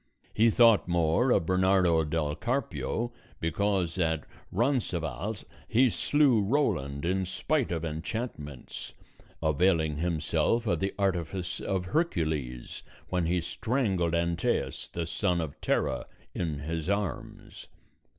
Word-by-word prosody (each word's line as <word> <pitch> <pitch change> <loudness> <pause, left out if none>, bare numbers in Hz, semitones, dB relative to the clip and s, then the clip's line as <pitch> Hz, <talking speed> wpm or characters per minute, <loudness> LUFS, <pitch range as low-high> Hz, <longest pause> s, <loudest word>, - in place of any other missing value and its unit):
He 115 +2 +5
thought 115 -3 +5
more 85 +7 +2
of 85 - +3
Bernardo 95 -2 +3
del 75 -1 -1
Carpio 120 - -2 0.3
because 95 0 0
at 80 -4 +1 0.3
Roncesvalles 100 - -1 0.2
he 120 +1 +4
slew 140 -5 +3
Roland 95 - 0
in 95 +2 +1
spite 135 +7 0
of 85 -1 -2
enchantments, 80 - -5 0.5
availing 80 -1 +2
himself 90 +8 +1
of 85 -7 +1
the 95 +1 -2
artifice 95 -2 -1
of 95 -2 -2
Hercules 80 - -1 0.3
when 90 -2 0
he 90 +1 +1
strangled 95 -4 0
Antæus 85 0 -1
the 85 - -3
son 90 +2 0
of 80 -4 -5
Terra - - 0 0.3
in 80 -4 -2
his 80 +3 -3
arms. 100 -2 -4
90 Hz, 115 wpm, -29 LUFS, 80-105 Hz, 0.5 s, He